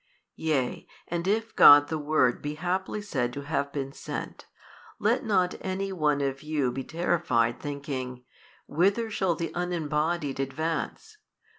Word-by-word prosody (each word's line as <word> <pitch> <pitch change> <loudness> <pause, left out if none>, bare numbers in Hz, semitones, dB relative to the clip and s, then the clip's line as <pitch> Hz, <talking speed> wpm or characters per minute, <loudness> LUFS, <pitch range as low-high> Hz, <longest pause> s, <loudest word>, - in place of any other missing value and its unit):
Yea 145 -6 -1 0.2
and 170 +1 -2
if 220 +2 0
God 145 0 +9
the 160 -1 -2
Word 145 -5 +2
be 150 0 -4
haply 185 +5 -2
said 130 -11 -1
to 140 - -5
have 140 -1 -2
been 135 -2 -4
sent, - - -6 0.5
let - - +1
not 185 -6 +2
any 195 +1 -2
one 150 -5 +1
of 135 0 -2
you 150 -4 0
be 135 +2 -4
terrified, 155 -9 0
thinking, 135 -3 -5 0.4
Whither 200 +8 +1
shall 190 -4 +1
the 165 +1 -3
Unembodied 160 -4 -1
advance? 160 - -3
155 Hz, 140 wpm, -27 LUFS, 140-180 Hz, 0.5 s, God